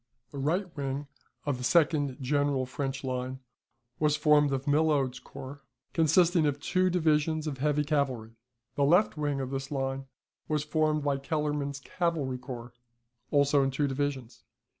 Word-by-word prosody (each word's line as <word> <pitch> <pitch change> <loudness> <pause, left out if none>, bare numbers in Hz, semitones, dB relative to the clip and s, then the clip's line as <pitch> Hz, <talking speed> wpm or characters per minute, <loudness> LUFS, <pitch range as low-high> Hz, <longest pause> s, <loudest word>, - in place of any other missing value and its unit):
The 140 - -6
right 165 +8 +1
wing 140 0 -3 0.4
of 140 -4 -1
the - - -5
second 145 -3 +2
general 140 0 +1
French 135 +1 -4
line 130 0 -3 0.6
was 150 -1 +2
formed 150 -2 +4
of 135 0 -2
Milhaud's 145 -4 +2
corps, 135 +2 -10 0.3
consisting 165 0 +4
of 145 0 -1
two 185 +5 +1
divisions 155 -2 +1
of 140 -4 -4
heavy 150 +1 +2
cavalry. 135 -7 -1 0.4
The 140 - +1
left 175 +9 +4
wing 145 -2 -1
of 130 -1 -3
this 135 0 -4
line 135 -1 -3 0.4
was 150 -2 0
formed 155 -1 +1
by 140 -1 +1
Kellerman's 145 -1 -2
cavalry 150 -7 -1
corps, 120 -2 -8 0.6
also 140 -1 +4
in 135 - +2
two 140 +2 0
divisions. 135 -3 -3
145 Hz, 150 wpm, -29 LUFS, 135-150 Hz, 0.6 s, formed